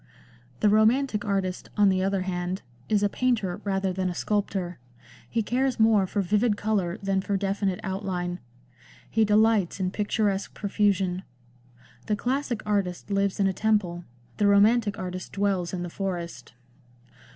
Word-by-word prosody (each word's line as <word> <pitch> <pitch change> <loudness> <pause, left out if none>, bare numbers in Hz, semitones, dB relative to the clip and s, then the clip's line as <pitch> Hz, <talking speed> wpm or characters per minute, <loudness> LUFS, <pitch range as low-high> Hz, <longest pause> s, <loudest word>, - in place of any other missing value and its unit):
The 210 - +5
romantic 220 +2 +3
artist, 195 -2 -2
on 205 -1 +5
the 185 -1 +2
other 195 0 0
hand, 180 0 -3 0.3
is 210 -1 +2
a - - +5
painter 210 -5 -1
rather 195 -1 0
than 185 0 -1
a 175 - -4
sculptor; 195 - -2 0.5
he 225 -1 0
cares 255 +3 0
more 220 -3 +4
for 200 +1 -1
vivid 210 +3 +2
colour 205 -4 0
than 195 -1 +1
for 200 +1 -1
definite 195 -1 -1
outline; 185 -2 -3 0.7
he 225 - +3
delights 210 -3 +3
in 185 -1 0
picturesque 205 -1 -1
profusion. 195 -3 +1 0.9
The 210 - +1
classic 250 +1 -2
artist 200 -2 -1
lives 200 0 +1
in 200 - +3
a 190 - +2
temple; 190 -5 0 0.3
the 205 - +3
romantic 205 +1 +4
artist 185 -1 -6
dwells 195 -3 0
in 180 -2 -3
the - - -4
forest. 170 -11 -5
200 Hz, 150 wpm, -26 LUFS, 185-210 Hz, 0.9 s, The